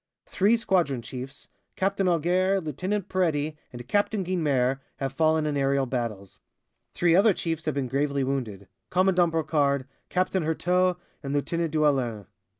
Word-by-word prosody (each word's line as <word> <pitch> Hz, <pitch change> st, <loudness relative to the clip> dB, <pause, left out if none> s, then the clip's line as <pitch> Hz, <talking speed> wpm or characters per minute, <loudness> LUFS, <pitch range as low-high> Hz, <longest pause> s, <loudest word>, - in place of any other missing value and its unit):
Three 205 Hz, +4 st, +2 dB
squadron 170 Hz, -, 0 dB
chiefs, 130 Hz, +4 st, -8 dB, 0.3 s
Captain 195 Hz, 0 st, 0 dB
Auger, 180 Hz, +3 st, +2 dB
Lieutenant 185 Hz, +5 st, -3 dB
Peretti 155 Hz, -5 st, 0 dB, 0.2 s
and 120 Hz, 0 st, -9 dB
Captain 205 Hz, -, +1 dB
Guynemer, 140 Hz, -8 st, +1 dB, 0.2 s
have 135 Hz, -1 st, -4 dB
fallen 155 Hz, +1 st, +2 dB
in 150 Hz, -1 st, -1 dB
aerial 140 Hz, -1 st, +1 dB
battles; 115 Hz, -6 st, -4 dB, 0.6 s
three 170 Hz, -1 st, +3 dB
other 200 Hz, +1 st, +5 dB
chiefs 165 Hz, -1 st, -3 dB
have 155 Hz, -3 st, -1 dB
been 135 Hz, -2 st, -1 dB
gravely 140 Hz, +1 st, 0 dB
wounded 115 Hz, -8 st, -3 dB, 0.2 s
Commandant 180 Hz, -2 st, +3 dB
Brocard, 145 Hz, -4 st, +1 dB, 0.2 s
Captain 185 Hz, +1 st, 0 dB
Heurteaux 180 Hz, +3 st, +1 dB, 0.2 s
and 140 Hz, -1 st, -4 dB
Lieutenant 165 Hz, +3 st, -1 dB
Duellin. 135 Hz, -9 st, +1 dB
155 Hz, 140 wpm, -26 LUFS, 135-180 Hz, 0.6 s, other